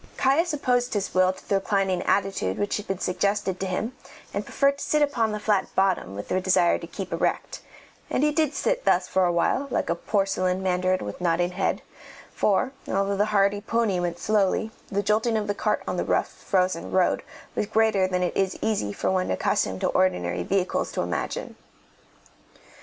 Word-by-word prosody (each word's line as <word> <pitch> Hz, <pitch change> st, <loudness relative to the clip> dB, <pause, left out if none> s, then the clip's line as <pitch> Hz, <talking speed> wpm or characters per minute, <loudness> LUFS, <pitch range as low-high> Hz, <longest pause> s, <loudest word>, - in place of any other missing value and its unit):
Caius 310 Hz, +7 st, +2 dB
opposed 250 Hz, -5 st, 0 dB
his 200 Hz, -1 st, -2 dB
will 185 Hz, 0 st, +4 dB
to 185 Hz, -, -14 dB
the -, -, 0 dB
reclining 195 Hz, -2 st, +1 dB
attitude 195 Hz, -, 0 dB
which 205 Hz, -, -1 dB
had 210 Hz, -, -7 dB
been 195 Hz, -, -2 dB
suggested 195 Hz, +1 st, -1 dB
to 190 Hz, -, -2 dB
him, 220 Hz, +7 st, -3 dB, 0.4 s
and -, -, -2 dB
preferred 280 Hz, 0 st, +1 dB
to -, -, -4 dB
sit 300 Hz, -1 st, +2 dB
upon 235 Hz, -7 st, +1 dB
the 210 Hz, -, -3 dB
flat 210 Hz, -2 st, +1 dB
bottom 190 Hz, -, +1 dB
with 100 Hz, -, -6 dB
the 185 Hz, -, 0 dB
desire 180 Hz, -2 st, +3 dB
to -, -, -8 dB
keep -, -, -6 dB
erect; -, -, -1 dB, 0.5 s
and 270 Hz, -, 0 dB
he 300 Hz, -, +3 dB
did 300 Hz, -1 st, +1 dB
sit -, -, 0 dB
thus 180 Hz, +1 st, +2 dB
for 190 Hz, -1 st, +2 dB
awhile, 175 Hz, +10 st, +1 dB
like -, -, -1 dB
a -, -, +4 dB
porcelain 190 Hz, -1 st, 0 dB
mandarin 185 Hz, -, +1 dB
with 105 Hz, -, -7 dB
nodding 175 Hz, 0 st, +1 dB
head, 190 Hz, +1 st, -1 dB, 0.5 s
for, 215 Hz, +6 st, +1 dB, 0.2 s
although 195 Hz, +1 st, 0 dB
the 205 Hz, +1 st, +2 dB
hardy 205 Hz, -1 st, +2 dB
pony 220 Hz, -4 st, 0 dB
went 175 Hz, -1 st, -2 dB
slowly, 210 Hz, +2 st, +1 dB, 0.2 s
the 200 Hz, 0 st, 0 dB
jolting 220 Hz, +3 st, +2 dB
of 215 Hz, -, -1 dB
the 205 Hz, -, -1 dB
cart -, -, -1 dB
on -, -, -2 dB
the -, -, 0 dB
rough, -, -, +1 dB
frozen 185 Hz, -3 st, -1 dB
road 185 Hz, -1 st, +2 dB, 0.3 s
was 210 Hz, -, -1 dB
greater 220 Hz, -3 st, +3 dB
than 180 Hz, -1 st, 0 dB
it 180 Hz, -, -1 dB
is 190 Hz, -1 st, 0 dB
easy 210 Hz, -, -1 dB
for 100 Hz, -, -1 dB
one 185 Hz, -1 st, 0 dB
accustomed 95 Hz, 0 st, 0 dB
to -, -, +2 dB
ordinary 90 Hz, -, +1 dB
vehicles 185 Hz, -, 0 dB
to -, -, -2 dB
imagine. -, -, -3 dB
195 Hz, 190 wpm, -25 LUFS, 185-215 Hz, 0.5 s, will